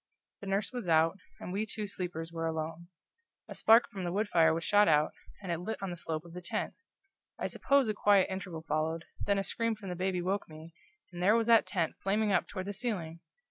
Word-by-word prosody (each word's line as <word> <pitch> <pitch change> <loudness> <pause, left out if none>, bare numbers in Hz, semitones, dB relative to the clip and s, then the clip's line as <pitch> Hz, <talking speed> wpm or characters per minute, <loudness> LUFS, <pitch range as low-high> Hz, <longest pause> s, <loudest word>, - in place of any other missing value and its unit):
The 200 - -9
nurse 195 +1 0
was 245 -7 -4
out, 165 +3 +3 0.2
and 180 - -6
we 205 +2 0
two 210 0 -4
sleepers 175 -4 -5
were 165 0 -2
alone. 160 +1 -4 0.6
A - - -7
spark 225 +2 +5
from 190 -2 -5
the 175 - -2
wood 205 +3 0
fire 165 -3 +5
was 165 +1 -1
shot 205 +2 +5
out, 150 -1 +4 0.3
and 180 - -3
it 170 - -1
lit 220 +6 -4
on 195 -2 -4
the - - -4
slope 160 -1 -4
of 170 - -12
the 180 - -7
tent. 175 - -3 0.6
I - - -3
suppose 275 -3 +2
a 215 - +1
quiet 205 -2 +4
interval 185 -4 -5
followed, 160 +2 -1 0.2
then 200 -1 +2
a 195 - 0
scream 230 +2 -1
from 205 -3 -8
the 180 - -3
baby 185 +1 -1
awoke 185 +2 -1
me, 160 +1 -11 0.4
and 175 - -6
there 205 +5 +5
was 230 -1 +2
that 230 -1 +5
tent 170 -5 -1
flaming 205 +2 +1
up 180 - +2
toward 185 -2 -5
the 200 - -4
ceiling! 190 -7 -3
185 Hz, 230 wpm, -31 LUFS, 165-205 Hz, 0.6 s, spark